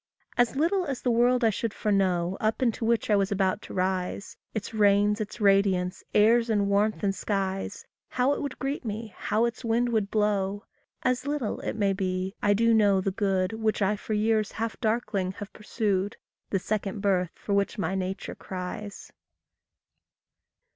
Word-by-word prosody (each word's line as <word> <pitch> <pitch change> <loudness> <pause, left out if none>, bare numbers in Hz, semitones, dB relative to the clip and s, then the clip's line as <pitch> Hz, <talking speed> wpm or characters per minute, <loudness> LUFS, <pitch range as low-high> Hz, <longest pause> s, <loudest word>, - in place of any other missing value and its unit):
And 245 +1 +2
little 345 +6 +1
as 270 -5 -4
the 245 - +2
world 245 +1 +3
I 225 - +5
should 220 +1 -3
foreknow 190 -4 +1
Up 220 +4 0
into 235 -1 0
which 230 -1 +1
I - - +6
was 200 0 +1
about 195 0 +1
to - - -10
rise 185 +1 -2 0.2
Its 220 0 -5
rains, 205 0 +3
its 215 +2 -6
radiance, 195 -3 +2
airs, 230 +3 +5
and 205 -2 +2
warmth, 210 +2 +1
and 195 -1 +2
skies, 195 -1 -3 0.2
How 255 +3 +2
it - - -3
would 280 -3 -4
greet 275 +2 -3
me, 220 -1 -5
how 220 +3 +1
its 235 +2 -4
wind 235 +1 +1
would 215 -4 0
blow 205 -1 0 0.4
As 255 +2 0
little, 290 -7 -2
it - - -4
may 200 -2 +1
be, 185 0 -2
I 205 0 +3
do 230 +2 +3
know 205 -3 +4
the 190 +1 -1
good 195 0 0
Which 220 -1 0
I 200 +2 +2
for 215 - -5
years 215 0 +1
half 225 +1 -3
darkling 215 -5 -1
have 205 0 -9
pursued 205 -2 -1 0.3
The 195 - +1
second 200 +1 -2
birth 185 -4 +2
for 205 - -4
which 200 +3 +1
my 195 -2 -1
nature 190 0 -3
cries. 190 +2 -7
210 Hz, 175 wpm, -27 LUFS, 195-225 Hz, 0.4 s, I